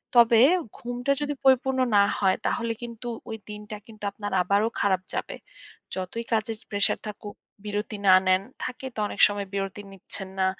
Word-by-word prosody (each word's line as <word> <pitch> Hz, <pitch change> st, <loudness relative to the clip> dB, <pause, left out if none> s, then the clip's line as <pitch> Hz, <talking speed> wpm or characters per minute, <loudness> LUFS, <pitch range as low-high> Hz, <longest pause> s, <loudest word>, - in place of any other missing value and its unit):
তবে 235 Hz, -1 st, +7 dB, 0.4 s
ঘুমটা 245 Hz, +3 st, -2 dB
যদি 290 Hz, 0 st, -1 dB
পরিপূর্ণ 265 Hz, 0 st, +4 dB, 0.2 s
না 200 Hz, -, +7 dB, 0.2 s
হয় 190 Hz, -2 st, +3 dB
তাহলে 230 Hz, -1 st, 0 dB
কিন্তু, 235 Hz, 0 st, -7 dB, 0.2 s
ওই 220 Hz, -, -4 dB
দিনটা 210 Hz, +1 st, -7 dB
কিন্তু 215 Hz, -2 st, -14 dB
আপনার 205 Hz, 0 st, -6 dB
আবারও 200 Hz, +5 st, +2 dB
খারাপ 190 Hz, -2 st, +2 dB
যাবে। -, -, -3 dB, 0.6 s
যতই 190 Hz, +5 st, -4 dB
কাজের 220 Hz, 0 st, 0 dB
প্রেশার 205 Hz, -1 st, +2 dB
থাকুক, 205 Hz, 0 st, -8 dB, 0.3 s
বিরতি 210 Hz, +1 st, -3 dB
না 185 Hz, -, +9 dB
নেন, 185 Hz, +1 st, +4 dB, 0.2 s
থাকে 255 Hz, +2 st, -5 dB
তো -, -, -4 dB
অনেক 205 Hz, -, -8 dB
সময় 205 Hz, -1 st, -4 dB
বিরতি 195 Hz, 0 st, -3 dB
নিচ্ছেন 190 Hz, 0 st, -6 dB
না। 190 Hz, -, +3 dB
210 Hz, 165 wpm, -26 LUFS, 200-235 Hz, 0.6 s, না